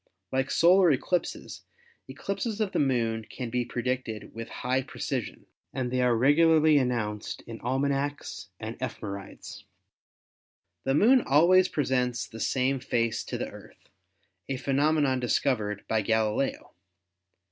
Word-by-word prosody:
Like 130 0 0
solar 180 +1 +5
eclipses, 165 +5 -1 0.5
eclipses 225 -5 -4
of 210 -3 0
the - - 0
Moon 115 -5 +1
can 125 -3 -6
be 125 0 0
predicted 120 -2 -4
with 115 0 -7
high 130 +2 -1
precision, - - -5 0.3
and 125 -2 -2
they 125 0 +1
are 125 -2 +3
regularly 155 +3 +5
announced 110 -5 -2
in 115 -1 -9
almanacs 140 -1 -2
and 110 +1 -6
ephemerides. 100 -6 -7 1.2
The 135 - +2
Moon 245 - +5
always 180 +5 +5
presents 125 -6 0
the 115 - -11
same 130 +3 0
face 115 -3 -1
to - - -4
the - - -4
Earth, - - -15 0.6
a 135 - -1
phenomenon 140 0 +1
discovered 110 -4 0
by 110 -1 +1
Galileo. 110 +4 0
130 Hz, 125 wpm, -27 LUFS, 115-145 Hz, 1.2 s, solar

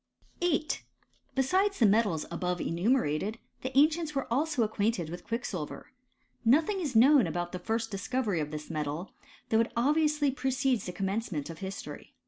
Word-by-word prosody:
8. 320 -3 0 0.5
Besides 375 +10 +2
the 230 - +4
metals 205 -6 +3
above 180 +1 -2
enumerated, 200 - 0 0.2
the 260 - -2
an 290 +2 +8
cients 315 -2 -4
were 275 - 0
also 290 -1 +1
acquainted 210 -5 -1
with 175 0 -7
quicksilver. 220 -9 -4 0.5
Nothing 310 - +3
is 285 -8 -3
known 265 +3 +6
about 175 0 -3
the 180 - -5
first 225 +4 -2
discovery 210 -1 -1
of 150 -1 -2
this 150 +1 -6
metal; 155 +3 -3 0.4
though 220 - +3
it 230 - +1
obviously 300 +2 +2
precedes 260 -3 0
the - - -3
commencement 190 -5 -2
of 165 - -10
history. 195 0 -7
225 Hz, 155 wpm, -30 LUFS, 180-270 Hz, 0.5 s, an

